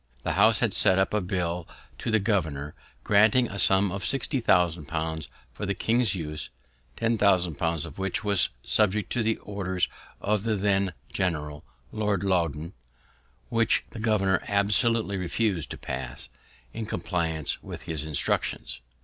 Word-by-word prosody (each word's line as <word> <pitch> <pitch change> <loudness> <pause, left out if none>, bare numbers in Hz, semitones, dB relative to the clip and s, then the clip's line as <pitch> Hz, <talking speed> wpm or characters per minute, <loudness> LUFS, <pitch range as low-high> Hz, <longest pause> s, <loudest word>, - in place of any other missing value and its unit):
The - - 0
House - - +4
had - - +2
sent 95 - +4
up 95 - +1
a 105 - +2
bill 90 -2 -2 0.3
to - - -3
the 110 - +4
governor, 80 -9 -1 0.3
granting 110 +4 +5
a 100 - -5
sum 95 +2 +3
of 95 0 -4
sixty 130 - 0
thousand 90 - +2
pounds 80 -1 -3 0.2
for 105 - -5
the 100 - 0
king's 115 +1 +2
use 75 -3 -4 0.5
(ten 115 -1 0
thousand 90 -6 +3
pounds 85 -1 0
of 80 +2 -10
which 95 -1 -1
was 100 -3 +3
subjected 105 -1 +1
to 120 - +1
the 110 0 +1
orders 95 -3 -2 0.3
of 105 0 0
the 110 0 0
then 100 -2 +1 0.2
general, 75 -5 -2 0.3
Lord 105 -3 0
Loudoun), 85 -4 0 0.8
which 115 -1 +2
the 115 - -8
governor 105 -4 +2
absolutely 105 +1 +2
refus'd 90 -1 0
to - - -6
pass, - - -5 0.4
in 110 -1 -4
compliance 80 -8 -1
with - - -8
his 80 -3 -3
instructions. 75 -4 -1
95 Hz, 155 wpm, -27 LUFS, 85-105 Hz, 0.8 s, granting